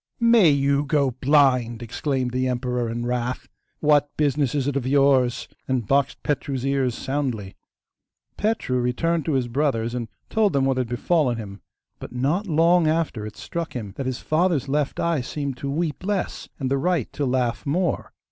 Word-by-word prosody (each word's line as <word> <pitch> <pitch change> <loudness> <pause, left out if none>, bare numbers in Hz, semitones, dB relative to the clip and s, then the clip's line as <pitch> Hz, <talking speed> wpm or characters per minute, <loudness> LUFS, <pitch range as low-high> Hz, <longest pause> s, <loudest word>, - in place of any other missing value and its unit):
'May 230 -7 +6
you 140 0 +2
go 140 -2 +1
blind!' 125 -3 +2
exclaimed 130 +2 -2
the 130 +1 0
emperor 125 -1 -1
in 120 +1 -3
wrath; 125 +1 -2 0.3
'what 145 -1 +4
business 145 -2 +1
is 140 -2 0
it 145 - -1
of 130 -2 -1
yours?' 135 -3 +3 0.2
and 130 -4 0
boxed 140 +4 +1
Petru's 135 -2 -2
ears 135 -3 +1
soundly. 125 -8 -3 0.8
Petru 210 - 0
returned 155 +7 0
to 160 - 0
his 130 -3 +1
brothers, 120 -3 0
and 120 -2 -3 0.2
told 215 -2 +2
them 135 -1 +2
what 135 -1 +1
had 130 -2 0
befallen 125 0 +1
him; 100 -3 -8 0.4
but - - -8
not 155 +11 0
long 165 +1 +4
after 155 -9 0
it 110 - -11
struck 165 +5 -5
him 105 -6 -5
that 135 - -4
his 130 -1 -2
father's 160 -2 +1
left 145 0 -1
eye 170 -5 +1
seemed 140 +1 -4
to 140 - -4
weep 155 +1 -2
less, 200 -1 -2
and 135 -3 -3
the 140 - +2
right 170 -4 0
to 145 - -2
laugh 125 -5 0
more. 170 +3 -1
135 Hz, 175 wpm, -23 LUFS, 125-150 Hz, 0.8 s, May